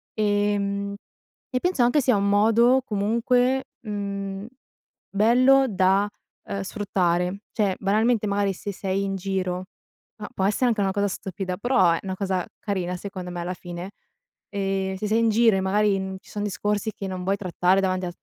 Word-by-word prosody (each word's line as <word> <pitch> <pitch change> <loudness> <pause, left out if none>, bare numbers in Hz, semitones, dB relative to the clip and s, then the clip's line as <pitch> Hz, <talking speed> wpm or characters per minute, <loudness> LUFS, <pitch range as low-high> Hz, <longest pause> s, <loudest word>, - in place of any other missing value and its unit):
Ehm, 205 -1 0 0.6
e 255 - 0
penso, 355 -6 +1
anche, 245 +5 +3
sia 250 -3 +3
un 200 0 +1
modo, 230 +5 +4
comunque, 240 +5 +1 0.2
mhmm, 200 -2 -4 0.6
bello, 255 +6 +5
da, 195 -1 +2 0.4
uhm, 200 - -4
sfruttare. 185 -2 0
Cioè, 200 -4 0
banalmente, 215 +2 +2
magari, 200 -1 +1
se 200 +2 -6
sei 195 +1 -2
in 195 0 -2
giro, 185 -1 -2 0.5
ma 210 -1 -7
può 190 - 0
essere 210 +5 +2
anche 225 -4 +1
una 195 - +1
cosa 205 +1 0
stupida, 185 -1 -4
però, 200 -6 +3
è - - -1
una 190 -1 -3
cosa 190 -2 -1
carina, 185 -4 -2
secondo 185 -1 -7
me, 175 - -5
alla 175 +1 -3
fine, 175 +2 -7 0.6
ehm, 195 -1 -1
se 210 +3 -3
sei 215 +2 +2
in 230 0 +3
giro, 225 -1 +4
e, - - 0
magari, 200 +1 +2
n 190 0 -4
ci - - -19
son 205 0 -4
discorsi, 210 +1 -1
che 195 - -6
non 185 -1 -5
vuoi 195 +2 +1
trattare 185 0 +2
davanti 185 -1 0
a 175 - -6
200 Hz, 175 wpm, -24 LUFS, 190-215 Hz, 0.6 s, bello